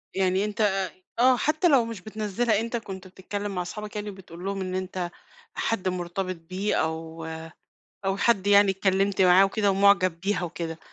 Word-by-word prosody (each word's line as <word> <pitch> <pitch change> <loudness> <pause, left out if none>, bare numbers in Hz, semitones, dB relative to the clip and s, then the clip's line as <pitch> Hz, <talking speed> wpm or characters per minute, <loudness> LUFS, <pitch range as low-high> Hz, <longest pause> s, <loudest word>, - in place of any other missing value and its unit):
يعني 190 +1 +2
أنت 210 +1 -3
أ 195 -2 +2
أ - - 0 0.4
آه، 255 +1 +5
حتى 310 +8 +2
لو 270 -7 +5
مش 230 -5 -7
بتنزِّلها، 215 +1 -1
أنت 230 +1 -2
كُنت 190 -4 -8
بتتكلّم 200 +2 -5
مع 180 - -1
اصحابك 210 +4 -7
يعني 210 0 -4
وبتقول 185 -2 -10
لهم 195 0 -2
إن 185 0 -3
أنت 185 -1 -3 0.4
حد 195 -5 -1
مُرتبط 185 +1 -2
بيه، 195 +3 -1
أو 160 0 -3 0.8
أو 195 0 0
حد 200 -3 +2
يعني 200 -1 +6
اتكلّمت 195 0 +1
معاه 185 +1 +7
وكده 200 +1 +1
ومُعجب 195 -3 +4
بيها 190 -1 -1
وكده، 165 -1 -5
195 Hz, 175 wpm, -26 LUFS, 185-210 Hz, 0.8 s, معاه